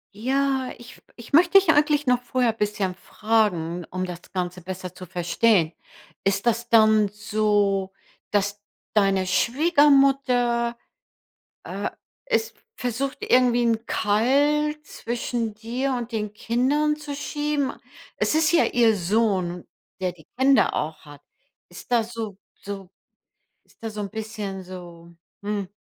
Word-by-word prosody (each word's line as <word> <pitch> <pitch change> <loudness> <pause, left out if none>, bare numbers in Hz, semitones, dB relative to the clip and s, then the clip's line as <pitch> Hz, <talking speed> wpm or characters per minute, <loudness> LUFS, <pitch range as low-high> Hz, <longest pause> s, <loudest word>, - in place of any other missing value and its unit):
Ja, 265 +3 0
ich 240 +1 -13
f - - -23
ich 235 +3 -13
möchte 350 +5 +6
dich 375 -4 +5
eigentlich 295 -1 +2
noch 250 -1 +2
vorher 245 -2 0
bisschen 205 -3 -1
fragen, 185 -5 0
um 185 0 -3
das 175 -1 -7
Ganze 180 -1 -3
besser 185 0 -7
zu 185 - -10
verstehen: 175 0 +2 0.5
Ist 195 +2 0
das 235 0 0
dann 215 -2 +5
so, 205 -2 0 0.4
dass 205 0 0 0.3
deine 195 -3 +3
Schwiegermutter, 265 - +3 0.9
äh, - - -4 0.4
es - - 0 0.2
versucht, 250 +3 -3
irgendwie 245 -1 +3
'n 230 -1 0
Keil 285 +8 +2
zwischen 235 -4 -4
dir 245 +5 -2
und 240 -1 -5
den 210 -2 -3
Kindern 270 +8 +1
zu 295 -2 -7
schieben? 295 -1 -2 0.4
Es - - +1
ist 315 +1 +3
ja 345 - +4
ihr 230 -3 +3
Sohn, 185 -2 0 0.3
der 185 -1 -1
die 160 -3 -19
Kinder 270 +1 +4
auch 155 +1 -3
hat. 145 -1 -13 0.5
Ist 175 +7 -13
das 235 0 +1
so 215 -4 -5 0.2
so 195 -2 -7 0.7
ist - - -29
da 225 - -4
so 210 0 -6
'n 200 - -4
bisschen 210 -3 -5
so 175 -2 -11 0.3
hm, 205 -2 -2
225 Hz, 135 wpm, -24 LUFS, 195-260 Hz, 0.9 s, möchte